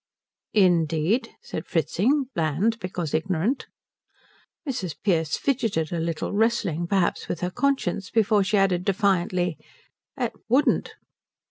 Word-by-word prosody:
"Indeed?" 175 - +3
said - - -6
Fritzing, 205 - +1
bland 170 +8 0
because 180 -5 -4
ignorant. 185 - 0 1.0
Mrs. 190 - -3
Pearce 165 -6 +1
fidgeted 225 - 0
a 170 - -1
little, 165 +2 -2
wrestling 200 -6 +1
perhaps 190 -2 0
with 170 - -4
her 180 0 -1
conscience, 200 -5 0
before 215 -2 +3
she 200 +2 +1
added 190 -2 +2
defiantly, 185 -4 +1 0.6
"It 245 -4 -1 0.2
wouldn't." 265 +5 +2
185 Hz, 115 wpm, -25 LUFS, 170-225 Hz, 1.0 s, Indeed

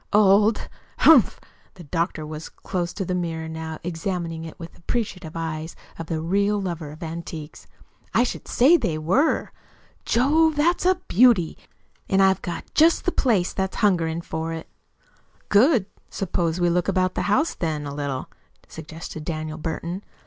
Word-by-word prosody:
"Old! 210 +1 +4 0.3
Humph!" 290 -10 +6 0.4
The 180 - -11
doctor 165 0 -2
was 155 +1 -7
close 175 -2 -4
to 195 - -3
the 180 - -2
mirror 165 -2 -3
now, 160 0 -5
examining 165 -1 -3
it 160 - -10
with 165 -1 -8
the - - -20
appreciative 180 -5 -3
eyes 160 0 -4 0.2
of 165 - -5
the 160 -1 -2
real 200 +5 +1
lover 170 -5 -4
of 150 +2 -12
the - - -4
antique. 160 -1 -7 0.5
"I 230 - +4
should 250 - -4
say 290 +8 +5
they 175 - -1
were. 185 - +1 0.5
Jove, 305 +6 +3
that's 345 +4 +2
a 370 - +5
beauty! 210 -6 +4 0.5
And 195 - +3
I've 190 0 +4
got 175 - -4
just 325 +2 +4
the 360 - +2
place 215 - +1
that's 190 0 -2
hungering 170 -5 +1
for 160 0 -4
it." 160 0 -7 0.8
"Good! 225 - +5 0.2
Suppose 170 -3 -1
we 175 -1 +2
look 175 0 +1
about 185 -1 +1
the - - -1
house, 305 +11 +2
then, 155 -3 -3
a 140 - -5
little," 140 -2 -3 0.4
suggested 160 0 -8
Daniel 155 0 -4
Burton. 170 +3 -4
175 Hz, 165 wpm, -24 LUFS, 160-205 Hz, 0.8 s, Humph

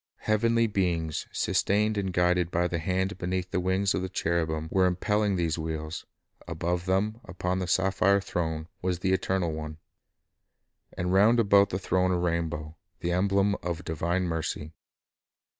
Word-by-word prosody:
Heavenly 115 +2 +2
beings, 85 -7 -1
sustained 105 +2 +1
and 100 -2 -1
guided 90 -1 +2
by 90 0 +1
the 85 -1 -2
hand 95 +4 -1
beneath 90 0 -2
the 90 - 0
wings 95 +2 +1
of - - -1
the 95 - -3
cherubim, 80 -3 -1
were 95 -1 +4
impelling 105 +3 +1
these 85 -2 -1
wheels; 80 0 -5 0.4
above 85 +1 -2
them, 105 +5 0
upon 90 +1 -2
the 90 - -2
sapphire 95 +2 +3
throne, 80 -4 -3
was 90 -1 0
the 95 +2 0
Eternal 95 -2 0
One; 75 0 -6 1.2
and 90 +1 -1
round 110 +5 +5
about 100 -2 +5
the 90 - -2
throne 95 -1 +1
a 90 - +2
rainbow, 85 -2 -2 0.2
the 85 - -1
emblem 100 +2 +2
of 85 -2 -4
divine 85 +3 -1
mercy. 80 -2 -3
90 Hz, 155 wpm, -28 LUFS, 85-95 Hz, 1.2 s, round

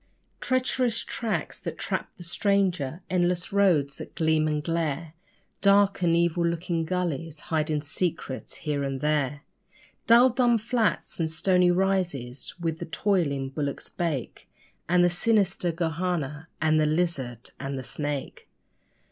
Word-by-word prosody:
Treacherous 255 -2 +1
tracks 225 -2 -3
that - - -5
trap - - -2
the 175 - -9
stranger, 180 -4 0
endless 180 0 0
roads 160 -9 +3
that - - -9
gleam 160 -1 +2
and 150 -1 -1
glare, 165 -1 -2 0.5
Dark 200 -1 +4
and 170 -2 +3
evil 170 0 +2
looking 170 0 -1
gullies, 165 -3 -2
hiding 155 -2 0
secrets 155 -4 -3
here 150 -3 -2
and 135 -1 -2
there! 145 -2 0 0.7
Dull 240 +2 +7
dumb 240 -1 +3
flats 225 -2 -1
and 160 -1 +1
stony 180 +3 +3
rises, 175 -9 -1
where 165 -1 0
the 160 - -7
toiling 160 -7 0
bullocks 140 -1 -3
bake, 160 -8 -3 0.4
And 175 0 +5
the 175 - +5
sinister 195 -2 +2
'gohanna', 160 -3 -2
and 155 0 +3
the 155 - +3
lizard, 150 -8 -1
and 135 0 -4
the 130 - -5
snake. 145 0 -4
170 Hz, 135 wpm, -27 LUFS, 150-185 Hz, 0.7 s, Dull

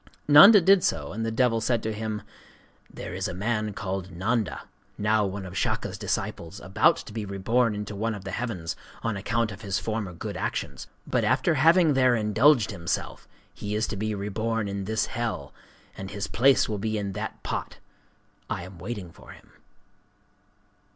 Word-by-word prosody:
Nanda 175 +9 +10
did 190 +1 +5
so; 75 0 -1
and 115 +2 -3
the 115 - -1
devil 115 0 +2
said 115 0 0
to 110 - -2
him: 110 0 -4 0.7
'There - - -7
is 95 +1 -2
a 90 - -5
man 105 +2 -1
called 95 -1 -4
Nanda,—now 105 +1 -1
one 95 0 -5
of 90 0 -9
Shaka's - - -1
disciples,—about 95 +3 0
to - - -9
be 110 -1 -3
reborn 105 +4 +1
into 105 0 -5
one 110 +2 -1
of 100 - -9
the 95 - -6
heavens, 95 -10 -3 0.3
on 115 -2 -1
account 115 +2 -1
of 95 +2 -10
his 100 -3 -1
former 110 -3 -3
good 85 - -6
actions. - - -4 0.2
But - - 0
after 170 - +2
having 160 +2 +5
there 130 -2 +4
indulged 115 +4 +4
himself, 85 -4 -4 0.3
he 105 0 -4
is 110 +1 +1
to - - -3
be 110 +1 -2
reborn 105 +2 -2
in 100 -1 -4
this 110 +1 0
hell; 115 - -4 0.4
and 95 0 -7
his 100 0 -4
place 135 +3 +4
will 105 -2 -3
be 110 +1 -1
in 100 -1 -3
that - - -6
pot. - - -4 0.7
I - - -3
am 90 -1 -11
waiting 100 -3 -6
for - - -14
him. - - -19
105 Hz, 175 wpm, -26 LUFS, 95-115 Hz, 0.7 s, Nanda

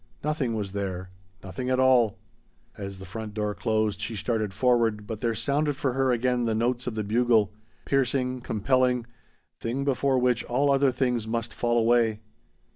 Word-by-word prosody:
Nothing 145 -6 -1
was 100 -3 -3
there. 95 -2 -4 0.3
Nothing 125 +7 -5
at 130 0 +2
all. 125 -5 +4 0.6
As 100 -1 -7
the 95 - -9
front 105 +2 -7
door 105 -1 -1
closed 105 0 0
she 110 +1 -3
started 110 0 -1
forward, 115 0 +1
but 110 -1 -6
there 115 -2 0
sounded 145 +6 0
for 135 -2 -1
her 135 0 +2
again 125 0 +1
the 110 -1 0
notes 120 +2 0
of 120 - -3
the 110 - -1
bugle 110 -1 +2 0.3
piercing, 130 -1 0
compelling, 125 +2 +1 0.5
thing 130 +4 -2
before 135 0 +2
which 125 -1 +2
all 140 +4 +2
other 135 -1 +3
things 125 -3 0
must 115 0 -2
fall 120 0 0
away. 115 -2 +3
120 Hz, 170 wpm, -26 LUFS, 110-130 Hz, 0.6 s, all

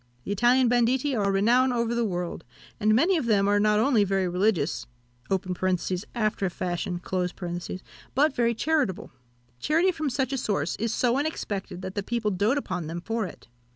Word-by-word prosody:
The - - -5
Italian 245 +5 +4
banditti 245 +3 +2
are 200 -3 +1
renowned 240 +6 +3
over 235 -1 0
the 235 0 +1
world; 180 -5 -3 0.4
and 215 +1 +3
many 340 +9 +3
of 260 - -2
them 200 -3 +3
are 205 0 +3
not 210 0 +3
only 225 -1 +4
very 195 -1 0
religious 180 - 0 1.3
(after 215 -3 0
a - - -2
fashion) 175 0 -3 1.2
but 290 +2 +3
very 235 -1 +2
charitable. 285 - 0 0.5
Charity 330 - +2
from 315 -4 -2
such 265 +1 -1
a 270 - -1
source 195 - -1
is 225 +1 -1
so 245 +2 +1
unexpected, 200 - -4
that 185 0 -5
the 205 - -2
people 225 0 -1
doat 205 +8 +1
upon 180 - -3
them 165 +2 -4
for 225 +1 -2
it. - - -13
220 Hz, 170 wpm, -26 LUFS, 195-255 Hz, 1.3 s, Italian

